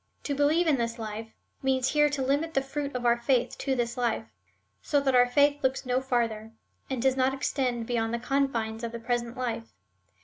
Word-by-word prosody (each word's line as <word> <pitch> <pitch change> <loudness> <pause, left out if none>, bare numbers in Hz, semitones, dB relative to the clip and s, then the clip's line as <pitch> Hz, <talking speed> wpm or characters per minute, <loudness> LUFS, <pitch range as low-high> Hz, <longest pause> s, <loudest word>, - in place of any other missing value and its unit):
To 285 - -2
believe 295 +5 +3
in 305 -4 +3
this 230 0 -2
life 220 0 -5 0.3
means 265 -1 +1
here 295 0 +4
to 285 -2 -2
limit 290 +5 0
the 270 - +2
fruit 280 0 -4
of 245 -1 -3
our 235 0 +4
faith 245 0 +1
to 270 -1 0
this 235 -1 -2
life, 235 -2 0 0.6
so 290 - +2
that 275 -1 +1
our 245 0 +6
faith 285 +3 +3
looks 260 0 0
no 250 +1 +1
farther, 230 -4 -1 0.4
and 265 -2 -2
does 265 +2 +2
not 265 0 +2
extend 250 -4 -1
beyond 225 -1 -1
the 235 - 0
confines 235 -4 -1
of 235 0 -4
the 235 - -5
present 240 +1 -2
life. 225 - -4
255 Hz, 205 wpm, -28 LUFS, 235-275 Hz, 0.6 s, our